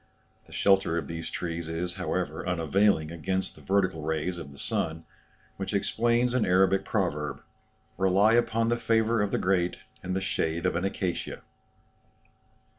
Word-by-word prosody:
The - - -18
shelter 95 -4 +3
of 80 - -2
these 80 +1 -5
trees 85 -1 -4
is, 85 +2 -2
however, 90 -2 -2
unavailing 85 -1 +2
against 95 +3 -2
the - - -16
vertical 95 -4 +1
rays 80 +3 -2
of 70 -4 -8
the 70 - -14
sun, 80 +3 -2 0.5
which - - -3
explains 120 +1 +2
an 125 -3 +2
Arabic 95 +1 +3
proverb, 75 -2 -2 0.6
"Rely 95 +4 +4
upon 115 -1 +2
the 120 - +2
favour 115 -1 +2
of 105 - +1
the - - 0
great 90 -2 +1 0.2
and 95 0 -3
the - - +1
shade 85 -3 -1
of 90 - +1
an 90 +3 0
acacia." 95 -2 -3
90 Hz, 155 wpm, -28 LUFS, 80-100 Hz, 0.6 s, Rely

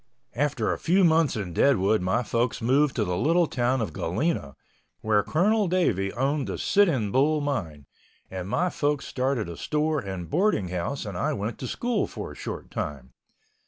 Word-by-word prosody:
After 135 -4 0
a - - -6
few 185 +4 +3
months 160 -3 +3
in 95 -6 -4
Deadwood 110 -3 +3
my 95 +7 +1
folks 115 +1 -1
moved 135 +4 +2
to 110 - +1
the 90 -1 -1
little 170 - +3
town 125 -2 0
of 95 -8 -3
Galena, 90 - -2 0.5
where 110 -1 +3
Colonel 205 - +2
Davey 110 - +1
owned 135 +3 0
the - - -3
Sitting 150 - +2
Bull 150 +5 +3
mine, 90 - -3 0.5
and 95 0 -5
my 180 - +1
folks 145 -1 -1
started 130 -5 -1
a 85 - -6
store 150 - 0
and 95 -7 -6
boarding 170 - +1
house 90 +11 -3
and 100 -3 -6
I 85 - 0
went 105 +3 -4
to 130 - -4
school 240 - -1
for - - -7
a - - -11
short - - -7
time. 65 -4 -5
130 Hz, 180 wpm, -26 LUFS, 95-155 Hz, 0.5 s, few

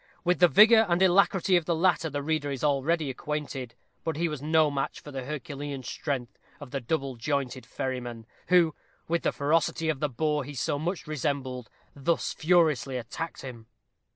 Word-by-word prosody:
With 180 0 +2
the 175 - +7
vigor 220 - +7
and 175 0 +2
alacrity 190 0 +4
of 170 - -1
the 170 - +1
latter 165 -1 +2
the 145 -1 -3
reader 155 -1 -1
is 135 -1 -4
already 150 +1 +1
acquainted, 140 -3 -5 0.3
but 160 -2 -2
he 170 +3 0
was 150 -4 -5
no 155 0 +3
match 135 -1 -2
for 145 - -11
the 135 -2 -5
herculean 145 -2 -5
strength 130 -3 -4 0.2
of 145 -4 -10
the 140 - -3
double 135 0 -2
jointed 135 0 -2
ferryman, 120 -3 -4 0.2
who, 175 -3 +4 0.3
with 170 +1 0
the - - +1
ferocity 160 +2 +1
of 150 -4 -1
the 150 - 0
boar 150 +3 0
he 145 +2 -8
so 145 +3 -1
much 175 +4 -3
resembled, 135 -4 -3 0.3
thus 160 +4 0
furiously 155 -6 +2
attacked 125 +7 -6
him. 120 -4 -9
150 Hz, 180 wpm, -28 LUFS, 135-165 Hz, 0.3 s, the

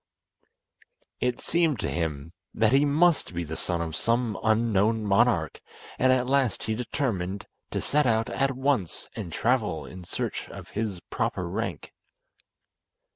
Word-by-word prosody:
It 125 -1 0
seemed 165 -5 +1
to - - -1
him 80 -1 -3 0.2
that 110 0 +3
he 140 +2 +5
must 155 - +3
be 85 - -1
the 80 0 -5
son 85 0 -1
of 80 -1 -5
some 115 +2 +1
unknown 110 -1 +2
monarch, 100 - +2 0.4
and 130 0 +5
at 130 -1 +3
last 130 -4 +1
he 110 - -1
determined 110 - -2 0.2
to - - -2
set 150 -2 +2
out 115 0 +2
at 135 0 +1
once 130 - -1
and 100 -7 -5
travel 110 -6 0
in 90 0 -9
search 85 - -4
of - - -10
his 105 -4 -3
proper - - -1
rank. - - -4
110 Hz, 145 wpm, -27 LUFS, 90-130 Hz, 0.4 s, he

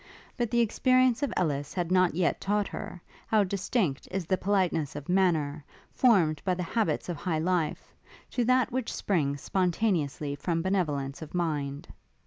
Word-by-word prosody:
But 240 -3 -1
the 240 0 +2
experience 255 +2 +3
of 285 -5 0
Ellis 145 -1 -1
had 175 -1 -2
not 185 -3 +3
yet 175 -1 +1
taught 205 0 0
her, 180 - -7 0.3
how 215 -2 +4
distinct 190 - -1
is 185 -2 -3
the 185 - +2
politeness 180 -7 0
of 145 -1 -7
manner, 160 -6 +1 0.3
formed 175 - +3
by 185 -2 +1
the 180 - -3
habits 220 +5 -1
of 175 -3 -3
high 160 +1 -1
life, 165 -1 -1 0.4
to 245 - 0
that 255 0 +3
which 255 -1 -2
springs 145 -8 -1
spontaneously 175 -6 0
from 165 +4 -2
benevolence 150 -8 -1
of 160 +2 -8
mind. 145 -5 -2
180 Hz, 160 wpm, -28 LUFS, 155-205 Hz, 0.4 s, how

